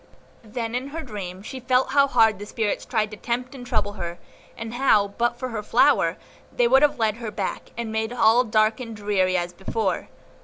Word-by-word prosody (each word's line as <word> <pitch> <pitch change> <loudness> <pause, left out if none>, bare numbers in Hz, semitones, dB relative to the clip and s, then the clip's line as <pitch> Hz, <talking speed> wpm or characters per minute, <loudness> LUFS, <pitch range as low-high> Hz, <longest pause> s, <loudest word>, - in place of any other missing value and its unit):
Then 225 +1 -4
in 250 +2 -2
her 320 +3 -6
dream 195 -6 -7
she 260 +4 -7
felt 255 +1 +1
how 280 -1 +5
hard 225 -6 +4
the 205 - -7
spirits 215 -1 -2
tried 220 -4 0
to 210 - -8
tempt 245 +3 -3
and 260 -3 -9
trouble 205 -4 -1
her, 170 0 -4 0.4
and 225 0 -6
how, 220 -6 +3
but 240 +4 -1
for 255 +1 -4
her 225 -3 -3
flower, - - +3 0.3
they 245 - +2
would 265 +3 +5
have 295 -1 +3
led 220 -1 +1
her 235 -2 -5
back, 200 -2 -4
and 235 -2 -3
made 220 +1 -1
all 240 0 +4
dark 215 -1 +2
and 230 -3 -6
dreary 195 -3 +1
as 175 0 -3
before. 195 +2 -2
225 Hz, 205 wpm, -24 LUFS, 210-245 Hz, 0.4 s, how